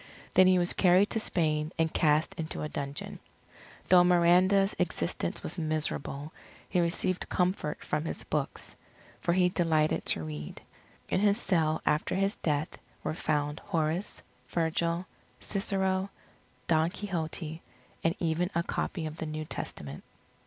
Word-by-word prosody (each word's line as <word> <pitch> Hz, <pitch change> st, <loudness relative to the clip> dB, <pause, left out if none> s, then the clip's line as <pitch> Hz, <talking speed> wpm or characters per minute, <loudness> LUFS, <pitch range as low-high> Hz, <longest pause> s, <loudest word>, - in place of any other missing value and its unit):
Then 185 Hz, -, +7 dB
he 185 Hz, 0 st, +5 dB
was 175 Hz, 0 st, +4 dB
carried 185 Hz, +2 st, +4 dB
to 225 Hz, -, 0 dB
Spain 155 Hz, -6 st, 0 dB
and 160 Hz, -1 st, +1 dB
cast 155 Hz, 0 st, +2 dB
into 155 Hz, -1 st, -4 dB
a -, -, -1 dB
dungeon. 140 Hz, 0 st, -5 dB, 0.7 s
Though 180 Hz, -1 st, +8 dB
Miranda's 180 Hz, +3 st, +4 dB
existence 85 Hz, -, -1 dB
was 170 Hz, -, -5 dB
miserable, 155 Hz, -2 st, -2 dB, 0.3 s
he 180 Hz, -, +1 dB
received 175 Hz, +1 st, 0 dB
comfort 180 Hz, -4 st, 0 dB
from 150 Hz, +1 st, -1 dB
his -, -, -4 dB
books, -, -, -3 dB, 0.4 s
for 170 Hz, -, +1 dB
he 180 Hz, 0 st, +4 dB
delighted 160 Hz, -4 st, +1 dB
to 80 Hz, -, +2 dB
read. 75 Hz, -1 st, -6 dB, 0.5 s
In -, -, +2 dB
his 205 Hz, 0 st, +3 dB
cell 160 Hz, -7 st, +1 dB
after 150 Hz, -, +1 dB
his 195 Hz, +2 st, +1 dB
death, 150 Hz, -1 st, -1 dB, 0.2 s
were -, -, -1 dB
found 150 Hz, -1 st, -1 dB
Horace, 165 Hz, 0 st, -2 dB, 0.2 s
Virgil, 170 Hz, +1 st, 0 dB, 0.3 s
Cicero, 195 Hz, -1 st, 0 dB, 0.6 s
Don 160 Hz, 0 st, +3 dB
Quixote, 165 Hz, -4 st, -4 dB, 0.4 s
and 165 Hz, +1 st, +2 dB
even 170 Hz, +1 st, 0 dB
a 170 Hz, -, +2 dB
copy 170 Hz, -1 st, -3 dB
of 155 Hz, 0 st, -6 dB
the 160 Hz, -, -4 dB
New 155 Hz, 0 st, -4 dB
Testament. 75 Hz, -, -6 dB
165 Hz, 140 wpm, -30 LUFS, 155-185 Hz, 0.7 s, Though